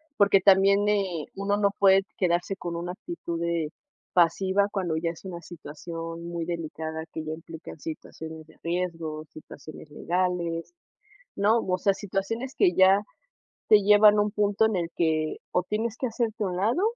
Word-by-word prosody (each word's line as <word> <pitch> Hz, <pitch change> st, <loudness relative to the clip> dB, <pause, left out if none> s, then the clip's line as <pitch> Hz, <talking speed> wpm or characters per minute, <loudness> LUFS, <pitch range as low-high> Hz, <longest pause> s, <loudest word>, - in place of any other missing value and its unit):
Porque 200 Hz, -4 st, +5 dB
también 195 Hz, +1 st, +5 dB
eh, 190 Hz, -7 st, 0 dB
uno 200 Hz, +1 st, 0 dB
no 200 Hz, -1 st, +2 dB
puede 195 Hz, 0 st, +5 dB
quedarse 175 Hz, +1 st, 0 dB
con 170 Hz, -2 st, -5 dB
una 175 Hz, +1 st, -4 dB
actitud 205 Hz, -, -6 dB
de 170 Hz, -2 st, -1 dB, 0.4 s
pasiva, 190 Hz, +3 st, +3 dB
cuando 180 Hz, -6 st, -1 dB
ya 165 Hz, +1 st, -1 dB
es 170 Hz, -, -14 dB
una 175 Hz, -2 st, -6 dB
situación 165 Hz, +1 st, -8 dB
muy 170 Hz, -1 st, -4 dB
delicada 160 Hz, -1 st, -4 dB
que 160 Hz, -, -6 dB
ya 155 Hz, -, -3 dB
implican 160 Hz, 0 st, -10 dB
situaciones 160 Hz, 0 st, -8 dB
de 160 Hz, -, -19 dB
riesgo, 165 Hz, -3 st, -3 dB
situaciones 155 Hz, 0 st, -12 dB
legales, 175 Hz, -, -2 dB, 0.6 s
¿no? 215 Hz, +4 st, +3 dB
O 185 Hz, -4 st, -1 dB
sea, 195 Hz, +2 st, +2 dB
situaciones 210 Hz, +6 st, -3 dB
que 375 Hz, -3 st, +4 dB
ya 190 Hz, +1 st, +6 dB, 0.7 s
te 215 Hz, -, +8 dB
llevan 210 Hz, +1 st, +6 dB
un 210 Hz, 0 st, +2 dB
punto 205 Hz, +1 st, +2 dB
en 220 Hz, -3 st, 0 dB
el 170 Hz, -2 st, -2 dB
que, 155 Hz, -2 st, 0 dB
o 180 Hz, -, +2 dB
tienes 215 Hz, +4 st, -2 dB
que 255 Hz, -, -2 dB
hacerte 225 Hz, -1 st, -2 dB
a -, -, 0 dB
un 180 Hz, -, -4 dB
lado 230 Hz, -, +1 dB
180 Hz, 165 wpm, -26 LUFS, 165-205 Hz, 0.7 s, te